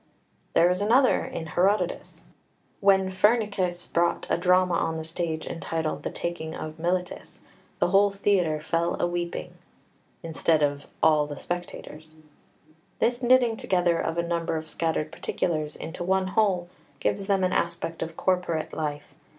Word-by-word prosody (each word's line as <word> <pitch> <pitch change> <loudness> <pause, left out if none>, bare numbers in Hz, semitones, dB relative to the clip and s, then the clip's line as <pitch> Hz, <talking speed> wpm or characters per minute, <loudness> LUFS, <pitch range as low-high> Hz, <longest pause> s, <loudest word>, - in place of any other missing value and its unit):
There 170 - +6
is 180 +2 -1
another 245 +6 +4
in 160 - -5
Herodotus: 180 +3 0 0.6
"When 190 -1 +4
Phrynichus 190 -3 +1
brought 170 0 +1
a - - +3
drama 180 0 +3
on 165 -1 0
the 160 - -4
stage 160 0 -3
entitled 165 -2 -3
The - - -3
Taking 160 -2 -4
of 155 0 -7
Miletus, 180 +2 -3 0.4
the - - +2
whole 200 +2 +5
theatre 195 -6 +1
fell 170 +2 -1
a - - +2
weeping" 175 0 -3 0.7
instead 160 -1 +1
of 145 0 -1 0.2
"all 150 -2 +4
the 145 -1 -7
spectators." 160 -3 -6 0.8
This 240 +1 +1
knitting 245 -2 +4
together 175 -4 +1
of 165 +1 -2
a 170 - +1
number 170 -1 -1
of 155 0 -6
scattered 160 -1 -2
particulars 155 -3 -2
into 165 +2 -6
one 190 +1 +1
whole 190 -4 +1 0.3
gives 195 -1 -1
them 195 -2 +2
an 185 0 +1
aspect 170 -1 -2
of 165 0 -5
corporate 180 -4 0
life. 150 -2 -4
175 Hz, 150 wpm, -26 LUFS, 160-190 Hz, 0.8 s, There